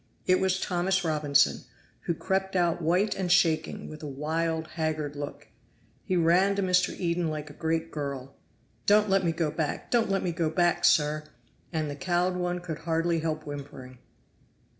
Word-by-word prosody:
It 185 Hz, 0 st, +4 dB
was 190 Hz, 0 st, +1 dB
Thomas 185 Hz, +1 st, 0 dB
Robinson, 150 Hz, -3 st, +2 dB, 0.4 s
who 170 Hz, -, +1 dB
crept 190 Hz, +2 st, -1 dB
out 175 Hz, -1 st, +2 dB
white 180 Hz, +6 st, +2 dB
and 185 Hz, -2 st, -2 dB
shaking, 160 Hz, -3 st, +2 dB
with 155 Hz, 0 st, -9 dB
a 150 Hz, -, -5 dB
wild, 160 Hz, +3 st, -2 dB
haggard 155 Hz, -2 st, -2 dB
look. 145 Hz, 0 st, -7 dB, 0.5 s
He 185 Hz, -, 0 dB
ran 180 Hz, +4 st, +4 dB
to 200 Hz, -, 0 dB
Mr. 180 Hz, -1 st, +2 dB
Eden 170 Hz, -1 st, 0 dB
like 155 Hz, -1 st, -5 dB
a -, -, -13 dB
great 160 Hz, +1 st, -2 dB
girl. 140 Hz, -3 st, -5 dB, 0.5 s
"Don't 210 Hz, 0 st, +5 dB
let 195 Hz, 0 st, +3 dB
me 170 Hz, -, +2 dB
go 160 Hz, -2 st, -1 dB
back 155 Hz, -1 st, -3 dB
don't 235 Hz, -3 st, +2 dB
let 195 Hz, 0 st, 0 dB
me 180 Hz, -, 0 dB
go 165 Hz, -1 st, 0 dB
back, 175 Hz, +2 st, +2 dB
sir!" 150 Hz, 0 st, +3 dB, 0.5 s
And 160 Hz, -3 st, -1 dB
the 145 Hz, -, -4 dB
cowed 180 Hz, +4 st, 0 dB
one 180 Hz, 0 st, -2 dB
could 165 Hz, -3 st, -5 dB
hardly 165 Hz, +1 st, 0 dB
help 155 Hz, -1 st, -2 dB
whimpering. 140 Hz, -3 st, -8 dB
165 Hz, 175 wpm, -28 LUFS, 155-180 Hz, 0.5 s, Don't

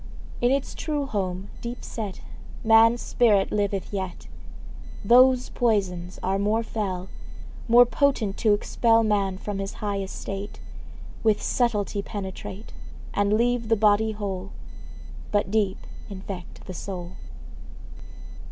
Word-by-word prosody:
In 240 Hz, -, +4 dB
its 275 Hz, +1 st, 0 dB
true 295 Hz, -3 st, -2 dB
home, 190 Hz, -5 st, -3 dB
deep 240 Hz, +1 st, -6 dB
set, 210 Hz, -5 st, -5 dB, 0.4 s
Man's 225 Hz, +1 st, +5 dB
spirit 210 Hz, -5 st, +3 dB
liveth 200 Hz, -1 st, -1 dB
yet. 190 Hz, -3 st, -4 dB, 0.8 s
Those 255 Hz, +3 st, +6 dB
poisons 190 Hz, -7 st, 0 dB
are 195 Hz, +1 st, 0 dB
more 215 Hz, +3 st, +1 dB
fell, 195 Hz, -5 st, -3 dB, 0.6 s
More 240 Hz, +1 st, +8 dB
potent 245 Hz, -6 st, +1 dB
to 215 Hz, -2 st, +4 dB
expel 230 Hz, +2 st, +2 dB
Man 200 Hz, -3 st, +1 dB
from 200 Hz, 0 st, -4 dB
his 195 Hz, +1 st, -4 dB
high 205 Hz, -3 st, -3 dB
estate, 195 Hz, +1 st, -6 dB, 0.6 s
Which 215 Hz, -2 st, +3 dB
subtly 210 Hz, -4 st, 0 dB
penetrate, 200 Hz, 0 st, -7 dB, 0.4 s
And 205 Hz, 0 st, +2 dB
leave 235 Hz, +1 st, +1 dB
the 225 Hz, -, +5 dB
body 215 Hz, +1 st, +3 dB
whole, 195 Hz, -2 st, -5 dB, 0.8 s
But 205 Hz, -2 st, +1 dB
deep 210 Hz, -3 st, +1 dB, 0.3 s
infect 190 Hz, -2 st, -8 dB
the 185 Hz, -, -7 dB
soul. 180 Hz, -1 st, -6 dB
205 Hz, 120 wpm, -25 LUFS, 195-230 Hz, 0.8 s, More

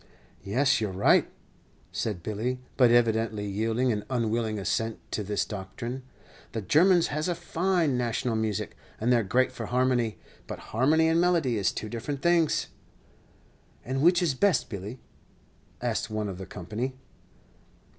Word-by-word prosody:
"Yes, 130 Hz, +5 st, +2 dB
you're 105 Hz, -3 st, -1 dB
right," 95 Hz, +2 st, +3 dB, 0.6 s
said 100 Hz, -7 st, -3 dB
Billy, 110 Hz, +6 st, -2 dB, 0.2 s
but 125 Hz, -3 st, +5 dB
evidently 115 Hz, -3 st, +2 dB
yielding 110 Hz, +5 st, 0 dB
an 105 Hz, -2 st, -2 dB
unwilling 115 Hz, -3 st, 0 dB
assent 110 Hz, +3 st, -1 dB
to -, -, -1 dB
this 105 Hz, 0 st, -1 dB
doctrine. 115 Hz, +6 st, -6 dB, 0.5 s
"The 110 Hz, -3 st, -3 dB
Germans 175 Hz, -, +4 dB
has 150 Hz, +2 st, -1 dB
a 175 Hz, -, 0 dB
fine 170 Hz, -4 st, 0 dB
national 120 Hz, 0 st, -1 dB
music, 110 Hz, -3 st, -2 dB, 0.2 s
and 120 Hz, +3 st, +2 dB
they -, -, +5 dB
're -, -, +2 dB
great 130 Hz, +6 st, +2 dB
for 115 Hz, -4 st, -6 dB
harmony. 125 Hz, -2 st, +1 dB, 0.3 s
But -, -, -5 dB, 0.2 s
harmony 150 Hz, +8 st, +4 dB
and 165 Hz, +1 st, +3 dB
melody 170 Hz, -9 st, +2 dB
is 100 Hz, -3 st, +1 dB
two 110 Hz, -, -5 dB
different 125 Hz, +5 st, -5 dB
things." 170 Hz, -3 st, +3 dB, 1.2 s
"And 130 Hz, +2 st, -1 dB
which 175 Hz, +3 st, +5 dB
is 160 Hz, -5 st, +2 dB
best, 190 Hz, +6 st, +2 dB
Billy?" 105 Hz, +5 st, -6 dB, 0.8 s
asked -, -, -1 dB
one 110 Hz, -1 st, -2 dB
of 95 Hz, -1 st, -7 dB
the 95 Hz, -, -7 dB
company. 110 Hz, +9 st, -4 dB
120 Hz, 150 wpm, -27 LUFS, 110-140 Hz, 1.2 s, but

